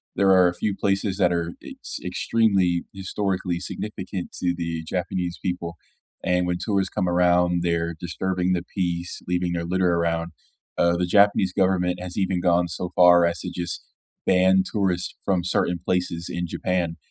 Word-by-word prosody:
there 100 +1 +3
are 90 -1 +6
a 90 - -1
few 100 +3 -1
places 100 -1 0
that 90 -3 +3
are 85 -1 -1
ex - - -7
extremely 90 -1 +1
historically 95 -2 -2
significant 95 -1 -5
to 90 -1 +1
the 85 -1 -3
Japanese 90 +1 -3
people, 90 -2 -3 0.5
and 90 0 +1
when 90 0 0
tourists 100 0 0
come 90 - -1
around, 90 0 +3
they're 85 -1 0
disturbing 90 +1 -1
the 85 -1 -1
peace, 90 -2 -2
leaving 90 0 0
their 85 -1 -2
litter 90 0 +1
around, 85 0 0 0.5
uh, 85 0 +3
the 90 - +1
Japanese 100 0 +4
government 90 -2 +1
has 90 -1 -6
even 95 -2 0
gone 90 0 +3
so 85 +1 -4
far 90 -1 +7
as 85 0 -2
to - - -5
just 85 -1 -4 0.4
ban 95 +1 +4
tourists 95 -4 -1
from 95 -3 +1
certain 90 0 0
places 90 -2 -1
in 85 0 -3
Japan 85 -1 -2
90 Hz, 165 wpm, -24 LUFS, 85-95 Hz, 0.5 s, far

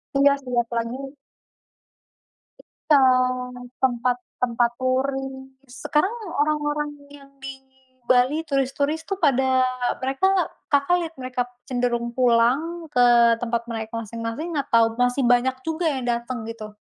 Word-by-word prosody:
Iya 280 0 +5
sih, 250 -1 -7
apalagi 230 +1 -3 1.7
Iya, 295 -2 +1 0.8
tempat-tempat 245 -1 0
touring. 265 +1 -2
Sekarang 295 - -1 0.3
orang-orang 295 0 0 0.2
yang 280 -1 -14
di 270 0 -5 0.6
Bali, 255 +5 +4
turis-turis 280 +3 -1
tuh 390 +2 -4
pada 260 -4 +3 0.3
mereka 270 +8 0 0.4
Kakak 285 +5 +3
lihat 335 -2 -5
mereka 255 -1 -3 0.2
cenderung 240 -2 -1
pulang 260 +8 +2
ke 240 -1 +5
tempat 235 0 -2
mereka 220 0 -5
masing-masing, 230 +9 -5
atau 235 -5 +3 0.2
masih 245 +2 +2
banyak 245 +2 +3
juga 325 +2 -2
yang 265 -3 -3
datang 235 0 -2
gitu? 215 -2 -8
255 Hz, 110 wpm, -23 LUFS, 240-285 Hz, 1.7 s, Iya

